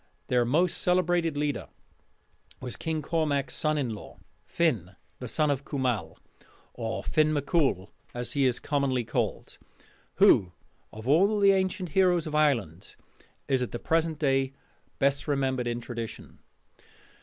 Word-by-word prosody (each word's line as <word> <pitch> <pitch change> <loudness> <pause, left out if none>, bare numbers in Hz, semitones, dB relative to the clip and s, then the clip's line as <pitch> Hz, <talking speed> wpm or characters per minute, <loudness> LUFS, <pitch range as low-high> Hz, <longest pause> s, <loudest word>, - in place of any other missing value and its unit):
Their 125 -1 +3
most 170 +8 +1
celebrated 175 -3 +1
leader 145 -1 -2 0.9
was 125 -2 -5
King 160 -1 -3
Cormac's 145 -4 0
son 155 0 0
in 130 -5 -1
law, 105 - -10 0.3
Finn, 110 - 0 0.2
the 125 - -6
son 150 +4 +1
of 140 0 -2
Cumal 130 -7 -2 0.6
or 115 -2 -4
Finn 155 0 +2
mac 145 -2 -1
Coole, 135 - +1 0.2
as 120 0 -4
he 140 -2 +2
is 125 - +1
commonly 140 -4 0
called 115 - -3 0.6
who 90 -3 +5 0.4
of 110 +2 -9
all 195 +9 +4
the 200 -1 +6
ancient 190 -1 0
heroes 180 -1 +3
of 155 - -6
Ireland 115 - 0 0.5
is 135 -2 +1
at 125 - -3
the - - -2
present 160 +4 0
day 135 -2 +1 0.4
best 140 0 +1
remembered 135 -3 0
in 120 0 -2
tradition. 115 -1 -7
140 Hz, 145 wpm, -28 LUFS, 125-160 Hz, 0.9 s, the